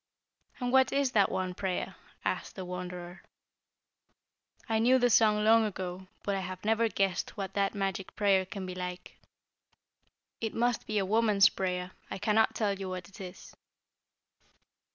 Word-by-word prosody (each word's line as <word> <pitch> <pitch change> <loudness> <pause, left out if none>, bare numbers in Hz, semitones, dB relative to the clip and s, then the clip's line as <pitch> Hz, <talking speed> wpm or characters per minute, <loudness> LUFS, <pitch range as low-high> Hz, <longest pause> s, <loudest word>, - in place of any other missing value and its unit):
"And 245 -1 -1
what 265 0 +5
is 275 -2 +1
that 205 -4 +4
one 185 -1 -2
prayer?" 185 0 -3 0.3
asked - - -2
the 185 - -6
Wanderer. 180 0 -6 1.5
"I 225 -2 +1
knew 250 +3 +5
the 245 -1 +3
song 210 -1 +4
long 225 +1 +6
ago, 185 -3 -4 0.2
but 200 - -1
I 195 - 0
have 185 +1 -6
never 225 +1 +3
guessed 195 0 -1
what 195 -1 -4
that 200 0 0
magic 195 -1 -3
prayer 200 -2 +3
can 195 -1 -6
be 185 - -5
like." 180 0 -7 1.2
"It 225 -2 -3
must 240 0 0
be 215 - -1
a 195 - +2
woman's 205 -1 +5
prayer; 180 -1 -3 0.2
I - - -4
cannot 210 +2 +2
tell 200 -3 0
you 190 -1 -4
what 185 -1 -6
it 200 - -12
is." 185 0 -10
195 Hz, 160 wpm, -30 LUFS, 185-220 Hz, 1.5 s, long